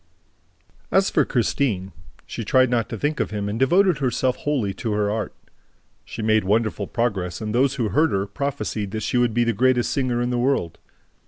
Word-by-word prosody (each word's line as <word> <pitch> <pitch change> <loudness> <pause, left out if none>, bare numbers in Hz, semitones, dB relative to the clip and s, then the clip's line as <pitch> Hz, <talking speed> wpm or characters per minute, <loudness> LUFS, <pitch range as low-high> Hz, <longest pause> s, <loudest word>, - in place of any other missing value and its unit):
As 195 0 +3
for - - +3
Christine, 110 -6 0 0.3
she 115 - -6
tried 130 +3 +3
not 115 -2 0
to 115 - -4
think 145 +8 -1
of - - 0
him 105 -1 -3
and 105 +2 -3
devoted 175 +4 +3
herself 130 -1 0
wholly 130 -10 -1
to 110 +2 -3
her 105 -1 0
art. 110 0 -2 0.7
She 110 - -6
made 110 0 +3
wonderful 105 0 0
progress 100 -7 -2
and 105 -1 -4
those 135 +2 +2
who 115 -6 -1
heard 155 +6 +3
her 95 -4 0
prophesied 105 -2 -3
that 110 -1 -3
she 125 - 0
would 120 -2 +1
be 120 - +3
the 115 0 +1
greatest 125 +2 +2
singer 130 -4 0
in 120 +1 -1
the 120 - 0
world. 125 - 0
120 Hz, 195 wpm, -23 LUFS, 105-130 Hz, 0.7 s, As